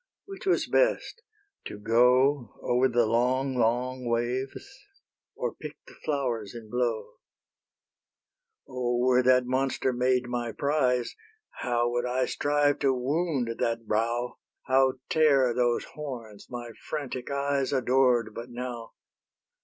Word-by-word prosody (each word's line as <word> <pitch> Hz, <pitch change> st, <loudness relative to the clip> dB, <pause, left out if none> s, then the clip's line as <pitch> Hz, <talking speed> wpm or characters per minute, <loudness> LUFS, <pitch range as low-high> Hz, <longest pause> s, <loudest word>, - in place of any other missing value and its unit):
Which 390 Hz, -1 st, -9 dB
was 375 Hz, -, +3 dB
best? -, -, +1 dB, 0.4 s
to -, -, -6 dB
go 125 Hz, +3 st, +3 dB
Over 125 Hz, +2 st, +3 dB
the 120 Hz, -2 st, +2 dB
long, 130 Hz, +4 st, +1 dB
long 125 Hz, +2 st, 0 dB
waves, 120 Hz, +3 st, -2 dB, 0.7 s
or -, -, -3 dB
pick -, -, -9 dB
The -, -, -15 dB
flowers 120 Hz, -7 st, -2 dB
in 110 Hz, -2 st, -10 dB
blow? 120 Hz, -2 st, -2 dB, 1.5 s
O, 125 Hz, -2 st, -1 dB
were 125 Hz, +1 st, +4 dB
that 125 Hz, 0 st, +4 dB
monster 130 Hz, 0 st, 0 dB
made 125 Hz, 0 st, +1 dB
my 120 Hz, -2 st, -3 dB
prize, 130 Hz, -4 st, 0 dB, 0.4 s
How 120 Hz, -1 st, +1 dB
would 120 Hz, +1 st, -1 dB
I 125 Hz, +1 st, +1 dB
strive 145 Hz, +2 st, +1 dB
to 135 Hz, -1 st, +2 dB
wound 135 Hz, -2 st, -1 dB
that 115 Hz, 0 st, -1 dB
brow, 115 Hz, +3 st, -1 dB, 0.2 s
How 130 Hz, 0 st, +3 dB
tear 140 Hz, -6 st, +4 dB
those 120 Hz, 0 st, +1 dB
horns, 120 Hz, -9 st, -8 dB
my 120 Hz, -1 st, -6 dB, 0.2 s
frantic 135 Hz, -5 st, -4 dB
eyes 140 Hz, -1 st, 0 dB
Adored 125 Hz, -4 st, +2 dB
but 120 Hz, +3 st, -7 dB
now! 120 Hz, -1 st, -6 dB
125 Hz, 125 wpm, -27 LUFS, 120-135 Hz, 1.5 s, were